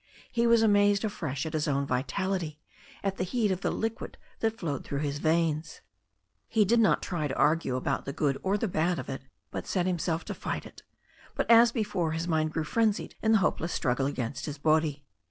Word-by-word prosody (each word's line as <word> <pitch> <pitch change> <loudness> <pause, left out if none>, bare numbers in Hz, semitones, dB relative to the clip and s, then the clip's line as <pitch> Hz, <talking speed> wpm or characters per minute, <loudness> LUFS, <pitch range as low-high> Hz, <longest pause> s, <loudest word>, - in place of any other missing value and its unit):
He 235 0 +2
was 230 -1 +5
amazed 205 -1 +4
afresh 150 -9 -3
at 160 - -5
his 155 0 0
own 140 -1 +1
vitality, 155 +5 -2 0.4
at 195 -1 -1
the - - 0
heat 210 +2 0
of 185 0 -2
the - - 0
liquid 225 0 -3 0.2
that 225 0 0
flowed 145 -9 -3
through 140 0 -3
his 145 -1 -2
veins. 160 0 0 0.7
He 215 -2 +3
did 235 +4 +3
not 220 - +3
try 165 -5 -2
to 135 - -4
argue 155 -4 +2
about 130 - -1
the 140 - -3
good 140 -2 0
or 195 +2 +1
the 225 - -1
bad 175 0 +1
of - - -6
it, 135 - -4 0.3
but - - -5
set 180 -2 0
himself 170 -2 -1
to - - -4
fight - - -4
it. - - -12 0.5
But, - - +1
as 230 0 +8
before, 195 -8 -1
his 165 +1 -2
mind 155 -2 +1
grew 160 0 -1
frenzied 215 +5 0
in 220 0 +3
the - - +7
hopeless 165 +1 -1
struggle 130 +1 0
against 130 -1 -3
his 150 -1 -5
body. 155 -1 +1
165 Hz, 210 wpm, -29 LUFS, 150-205 Hz, 0.7 s, as